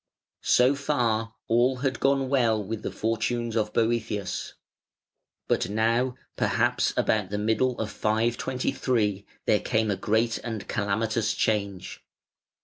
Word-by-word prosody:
] -, -, -66 dB, 0.2 s
So 125 Hz, +3 st, +5 dB
far 115 Hz, -6 st, 0 dB
all 120 Hz, +3 st, +3 dB
had 130 Hz, 0 st, 0 dB
gone 135 Hz, -1 st, +2 dB
well 115 Hz, -6 st, +2 dB
with 110 Hz, +2 st, -5 dB
the -, -, -4 dB
fortunes 115 Hz, +1 st, -1 dB
of 105 Hz, -2 st, 0 dB
Boëthius; 110 Hz, -4 st, -1 dB, 0.9 s
but -, -, +1 dB
now, 115 Hz, +4 st, +1 dB, 0.2 s
perhaps -, -, +1 dB
about 105 Hz, -4 st, +1 dB
the 105 Hz, -, -2 dB
middle 110 Hz, +4 st, +1 dB
of 110 Hz, -2 st, -2 dB
523, 110 Hz, -1 st, 0 dB, 0.2 s
there 105 Hz, -, +3 dB
came 110 Hz, -2 st, 0 dB
a -, -, +1 dB
great 110 Hz, +3 st, +1 dB
and 115 Hz, -3 st, -5 dB
calamitous 110 Hz, +2 st, 0 dB
change. 100 Hz, -4 st, -2 dB
115 Hz, 130 wpm, -26 LUFS, 105-120 Hz, 0.9 s, So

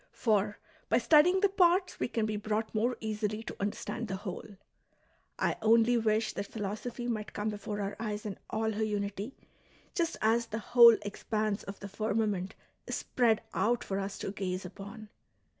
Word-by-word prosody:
For 210 Hz, -3 st, +1 dB, 0.3 s
by -, -, +4 dB
studying 350 Hz, +5 st, +5 dB
the 405 Hz, -, +4 dB
parts 365 Hz, -1 st, +3 dB
we -, -, 0 dB
can 225 Hz, -2 st, -1 dB
be 215 Hz, 0 st, -2 dB
brought 215 Hz, +1 st, -2 dB
more 235 Hz, +3 st, +1 dB
easily 215 Hz, 0 st, -2 dB
to -, -, -7 dB
understand 210 Hz, +3 st, -3 dB
the 190 Hz, -, -3 dB
whole. 195 Hz, +1 st, -7 dB, 0.8 s
I -, -, 0 dB
only 230 Hz, +2 st, +5 dB
wish 220 Hz, -1 st, +1 dB
that 200 Hz, -, -4 dB
philosophy 225 Hz, +3 st, -4 dB
might 215 Hz, -3 st, -3 dB
come 210 Hz, +1 st, -1 dB
before 210 Hz, 0 st, -4 dB
our 200 Hz, 0 st, -3 dB
eyes 210 Hz, -2 st, -3 dB
in 205 Hz, -2 st, -5 dB
all 220 Hz, 0 st, 0 dB
her 220 Hz, +1 st, -1 dB
unity, 205 Hz, +2 st, -3 dB, 0.6 s
just 335 Hz, -3 st, 0 dB
as 230 Hz, +2 st, +2 dB
the 220 Hz, -, -4 dB, 0.2 s
whole 235 Hz, -2 st, +10 dB
expanse 210 Hz, 0 st, -2 dB
of 195 Hz, 0 st, -8 dB
the 200 Hz, -, -5 dB
firmament 210 Hz, -2 st, -1 dB, 0.3 s
is -, -, -2 dB
spread 230 Hz, -3 st, +1 dB
out 240 Hz, +2 st, +1 dB
for 195 Hz, 0 st, -2 dB
us 195 Hz, 0 st, -4 dB
to -, -, -4 dB
gaze 185 Hz, -2 st, -3 dB
upon 200 Hz, +4 st, -9 dB
215 Hz, 175 wpm, -31 LUFS, 205-230 Hz, 0.8 s, whole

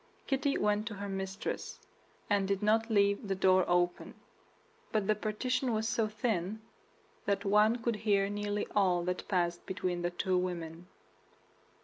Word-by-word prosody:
Kitty 275 Hz, 0 st, +1 dB
went 210 Hz, +1 st, +1 dB
to 210 Hz, -, -5 dB
her 200 Hz, +1 st, -5 dB
mistress, 195 Hz, 0 st, -4 dB, 0.5 s
and 200 Hz, -2 st, +2 dB
did 200 Hz, +1 st, -1 dB
not 225 Hz, +2 st, +3 dB
leave 200 Hz, 0 st, +2 dB
the 195 Hz, -, 0 dB
door 185 Hz, 0 st, +4 dB
open; 175 Hz, 0 st, 0 dB, 0.8 s
but 215 Hz, -2 st, +1 dB
the 215 Hz, -, +3 dB
partition 230 Hz, +4 st, -1 dB
was 220 Hz, 0 st, 0 dB
so 220 Hz, 0 st, +1 dB
thin 215 Hz, -2 st, -2 dB, 0.7 s
that 200 Hz, +1 st, 0 dB
one 210 Hz, +3 st, +4 dB
could 235 Hz, -2 st, -1 dB
hear 200 Hz, -2 st, +2 dB
nearly 205 Hz, 0 st, -2 dB
all 185 Hz, -4 st, +3 dB
that 180 Hz, +1 st, -3 dB
passed 175 Hz, -2 st, 0 dB
between 185 Hz, -2 st, -2 dB
the 175 Hz, -, 0 dB
two 180 Hz, +1 st, 0 dB
women. 170 Hz, -1 st, -4 dB
200 Hz, 150 wpm, -32 LUFS, 185-215 Hz, 0.8 s, door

